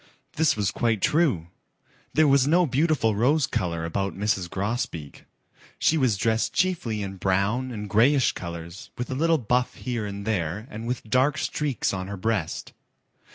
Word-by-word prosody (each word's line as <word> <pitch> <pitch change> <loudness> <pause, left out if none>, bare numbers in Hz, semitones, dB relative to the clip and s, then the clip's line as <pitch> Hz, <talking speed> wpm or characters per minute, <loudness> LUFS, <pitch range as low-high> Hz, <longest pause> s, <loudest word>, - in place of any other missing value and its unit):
This 160 0 +2
was 100 -2 +1
quite 115 -3 0
true. 145 - +2 0.7
There 155 +1 +5
was 140 -1 +4
no 175 +4 +4
beautiful 140 -5 +2
rose 140 +8 +3
color 85 -3 -2
about 95 +4 -2
Mrs. 95 -3 0
Grosbeak. 95 - -4 0.5
She 160 - +3
was 130 -9 +2
dressed 110 +2 0
chiefly 125 - 0
in 95 0 -6
brown 100 +8 0
and 105 -4 -5
grayish 125 +7 +4
colors 85 +1 -8
with 125 - -4
a - - -2
little 165 +3 +3
buff 125 0 0
here 120 -4 -3
and 100 0 -6
there 100 -1 -1
and 110 +2 -6
with 125 -1 -2
dark 130 +7 +2
streaks 145 -8 -1
on 95 -1 -4
her 100 0 -5
breast. 100 -5 -2
110 Hz, 160 wpm, -25 LUFS, 100-135 Hz, 0.7 s, There